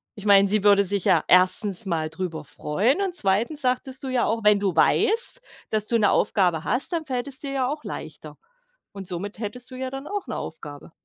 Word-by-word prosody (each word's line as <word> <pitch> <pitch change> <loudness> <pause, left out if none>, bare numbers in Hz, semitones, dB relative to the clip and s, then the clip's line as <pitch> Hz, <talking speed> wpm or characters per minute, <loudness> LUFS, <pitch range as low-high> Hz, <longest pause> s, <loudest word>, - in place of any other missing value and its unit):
Ich 205 - -10
meine, 200 -1 +6
sie 210 0 +1
würde 200 -1 +5
sich 200 0 -1
ja 180 -6 +3
1. 185 +3 +3
mal 160 -4 -2
drüber 160 -4 -5
freuen 200 - 0
und 385 -2 -1
2. 230 - 0
sagtest 255 +1 -2
du - - -4
ja 255 -2 0
auch, 225 +1 -1
wenn 210 -1 +5
du 195 -4 0
weißt, 455 - +2 0.3
dass 215 -1 0
du 235 - +2
'ne 205 -3 +3
Aufgabe 180 -7 +1
hast, 265 +8 -1
dann 330 -1 -1
fällt 255 -2 -3
es 270 -2 -8
dir 280 -2 -6
ja 260 -2 0
auch 300 +1 -5
leichter. - - -8 0.6
Und 195 -2 -9
somit 195 +4 -6
hättest 240 +4 -5
du 255 - -9
ja 260 0 -4
dann 270 +2 -7
auch 410 -2 -4
'ne - - -5
Aufgabe. 145 +1 -8
210 Hz, 215 wpm, -24 LUFS, 190-265 Hz, 0.6 s, meine